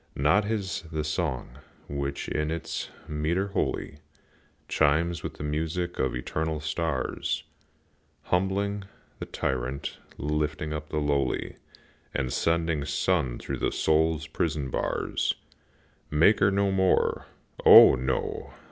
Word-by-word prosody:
Not 85 +10 +3
his 105 -4 -2
the 80 -1 -1
song, 75 -4 -3 0.3
which, 70 0 -3
in 75 0 -1
its 80 0 -4 0.2
metre 85 +6 -1
holy, 75 -6 -2 0.7
Chimes 80 +3 +2
with - - -5
the - - -7
music 80 +4 -2
of 65 - +1
the - - -2
eternal 80 +4 -2
stars, 80 -2 -2 0.8
Humbling 100 +2 0 0.3
the - - -5
tyrant, 65 +2 -3 0.2
lifting 75 +1 -1
up 75 0 -5
the 75 - -3
lowly, 70 -3 0 0.6
And 65 -2 -1
sending 80 -3 +1
sun 70 -2 0
through - - -4
the - - 0
soul's 80 0 +2
prison 75 -4 -2
bars. - - -1 0.7
Maker 95 +6 +5
no 100 0 +2
more, 95 -1 +2 0.4
O, - - +10
no! 65 0 -2
80 Hz, 120 wpm, -27 LUFS, 75-85 Hz, 0.8 s, O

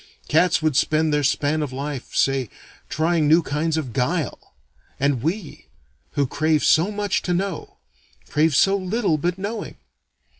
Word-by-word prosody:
Cats 165 +1 +3
would 155 -3 +1
spend 155 +2 +2
their 150 - +2
span 145 +3 +1
of 145 -3 -3
life, 140 0 -6
say, 135 -4 +1 0.4
trying 160 -1 +1
new 160 +3 +5
kinds 155 +3 -1
of 135 -7 -4
guile. 145 +3 -2 0.4
And 140 -3 +1
we, 165 - -4 0.5
who 145 - +1
crave 155 +3 0
so 165 +5 +4
much 205 -2 -1
to 180 - -1
know, 190 -2 -4 0.5
crave 150 0 +2
so 195 +7 +4
little 190 -3 0
but 175 +4 -1
knowing. 205 +3 -5
155 Hz, 150 wpm, -22 LUFS, 145-180 Hz, 0.5 s, new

